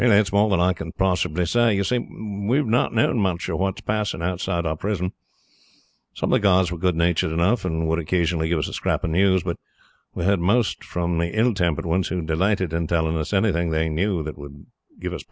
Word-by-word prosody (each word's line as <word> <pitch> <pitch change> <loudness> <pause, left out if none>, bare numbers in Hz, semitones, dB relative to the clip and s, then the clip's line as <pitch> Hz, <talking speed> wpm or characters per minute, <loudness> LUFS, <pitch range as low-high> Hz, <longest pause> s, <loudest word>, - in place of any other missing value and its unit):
"That 115 -4 +5
is 100 -2 0
more 105 +1 +4
than 95 -4 +2
I 90 +1 +3
can 80 -3 -8
possibly 90 -2 0
say. 120 +3 +3
You 100 - +1
see, 125 +5 +1
we 105 +1 -3
have 150 - +1
not 115 +2 +1
known 115 +1 +2
much 90 -4 -1
of - - -2
what 95 0 -1
is - - -9
passing 105 -5 -2
outside 85 -1 -1
our 80 0 -1
prison. 90 +1 -2 1.0
Some - - -2
of - - +6
the - - -11
guards 95 -3 +4
were 90 - -5
good 90 -1 +1
natured 85 -1 +1
enough, 95 +7 +1
and 80 -2 -1
would 80 +1 +1
occasionally 85 0 0
give 85 - +1
us 75 - -1
a - - -8
scrap - - -1
of - - -1
news; 95 +1 +3
but 85 -2 -3 0.6
we - - -3
heard 100 +1 +2
most 100 +6 +1
from 85 -1 -2
the 85 0 0
ill 120 +2 +3
tempered 85 -6 -1
ones, 85 +2 0
who 90 0 -3
delighted 90 +2 0
in 85 -1 -1
telling 80 -1 0
us 80 -2 -3
anything 95 -4 +1
they 80 0 0
knew 85 +2 0
that 75 -1 -7
would 70 0 -11 0.3
pain - - -4
us. - - -5
90 Hz, 235 wpm, -23 LUFS, 80-100 Hz, 1.0 s, of